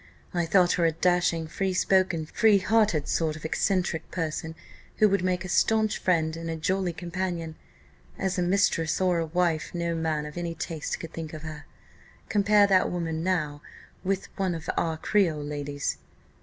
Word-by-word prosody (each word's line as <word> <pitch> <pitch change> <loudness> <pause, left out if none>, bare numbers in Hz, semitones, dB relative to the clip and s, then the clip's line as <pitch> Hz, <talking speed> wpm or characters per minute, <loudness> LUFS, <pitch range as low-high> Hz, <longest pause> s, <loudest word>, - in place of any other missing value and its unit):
I 175 -2 0
thought 180 0 +4
her 170 - +2
a - - +2
dashing, 175 -1 +1
free 190 +3 -2
spoken, 185 -4 +2
free 215 +5 +4
hearted 195 -5 +2
sort 160 -2 0
of 155 - -9
eccentric 180 0 0
person, 160 -1 -3 0.4
who 215 - +6
would 200 -2 +1
make 185 0 0
a - - -4
staunch 215 +3 +2
friend 160 -3 +1
and 165 0 -5
a 165 - -2
jolly 185 +3 0
companion. 170 -1 -4 0.6
As 190 -1 -1
a - - +2
mistress, 175 -3 +2
or 180 -2 +2
a 165 - -1
wife, 170 -1 0
no 170 -1 -1
man 160 -2 -1
of 150 +3 -6
any 170 -1 -3
taste 160 -2 -4
could 165 -1 -8
think 165 -1 -6
of 155 - -9
her. 150 -2 -8 0.6
Compare 205 0 +4
that 190 -2 +3
woman 165 -2 -2
now 155 -6 -1 0.4
with 195 0 -1
one 190 -3 0
of 160 - -8
our 160 -1 0
Creole 165 -5 +1
ladies." 145 -1 -3
170 Hz, 175 wpm, -27 LUFS, 160-185 Hz, 0.6 s, who